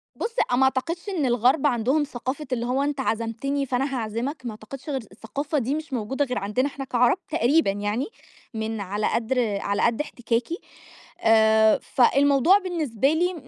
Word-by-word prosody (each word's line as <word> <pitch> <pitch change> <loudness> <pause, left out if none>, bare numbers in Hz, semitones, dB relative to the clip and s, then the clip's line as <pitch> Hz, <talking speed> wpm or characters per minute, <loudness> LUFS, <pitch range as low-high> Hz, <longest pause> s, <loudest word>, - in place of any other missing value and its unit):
بُص، 460 +1 -4 0.2
ما 260 +2 +4
أعتقدش 330 +9 0
إن 335 -8 -1
الغرب 255 +5 +3
عندهم 260 +4 +1
ثقافة 270 +2 -5
اللي 235 -1 -1
هو 255 +3 0
أنت 285 -1 -2
عزمتني 235 +4 -1
فأنا 265 +1 -1
هاعزمك، 235 +6 -3
ما 235 - -3
أعتقدش 250 +7 -10
غير 265 -3 -1
الثقافة 275 +9 -4
دي 265 +1 0
مش 310 -2 -6
موجودة 260 +4 -1
غير 250 -1 -3
عندنا 210 +7 0
إحنا 270 -1 -6
كعرب 245 +6 +3
تقريبًا 310 -6 +3
يعني، 205 +5 -2 0.5
من 220 -1 -3
على 205 +2 -1
قدر 230 -3 0
على 200 0 -1
قد 235 +4 +2
احتكاكي. 245 +2 -2 0.7
آآ 220 -1 +5
فالموضوع 280 +7 +4
بالنسبة 310 - 0
لي 355 +3 +1
255 Hz, 160 wpm, -24 LUFS, 225-285 Hz, 0.7 s, آآ